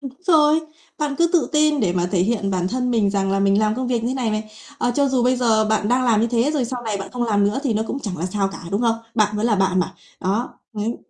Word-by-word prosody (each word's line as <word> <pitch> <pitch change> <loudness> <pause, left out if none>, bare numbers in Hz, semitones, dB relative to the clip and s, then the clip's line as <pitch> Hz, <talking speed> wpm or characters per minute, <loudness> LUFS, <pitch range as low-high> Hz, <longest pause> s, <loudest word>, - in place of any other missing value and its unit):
Đúng 275 -2 -6 0.2
rồi. 310 -2 +5 0.4
Bạn 295 -2 -1
cứ 340 - +4
tự 345 - +2
tin 300 -1 +3
để 185 -6 +1
mà 175 -1 0
thể 190 - 0
hiện 200 +1 0
bản 185 -1 -1
thân 250 +3 -1
mình 220 -4 +2
rằng 195 -1 0
là 195 0 +1
mình 195 0 +3
làm 215 0 +1
công 255 +2 -3
việc 240 -2 -1
như 250 +2 -1
này 245 -4 -1
này, 215 0 -3 0.3
ờ, 245 - +1
cho 280 0 +2
dù 260 -2 +1
bây 255 +1 +3
giờ 225 -3 +2
bạn 215 -1 0
đang 250 +2 +2
làm 225 -3 +3
như 230 - +2
thế, 235 +4 +1
rồi 285 -5 0
sau 245 +1 -5
này 220 -3 -2
bạn 195 0 -6
không 245 - -2
làm 205 -4 +2
nữa 205 +6 0
thì 250 -6 0
nó 215 - +1
cũng 275 - -3
chẳng 200 -8 -5
là 170 - -2
sao 195 +1 -1
cả, - - -8
đúng 200 - 0
không? 230 -2 +2 0.2
Bạn 215 -2 +2
vẫn 210 +2 0
là 215 -3 +2
bạn 190 -1 +1
mà, 190 +2 -3 0.3
đó, 200 +6 -2
đấy, 220 +2 -3
225 Hz, 295 wpm, -21 LUFS, 200-250 Hz, 0.4 s, rồi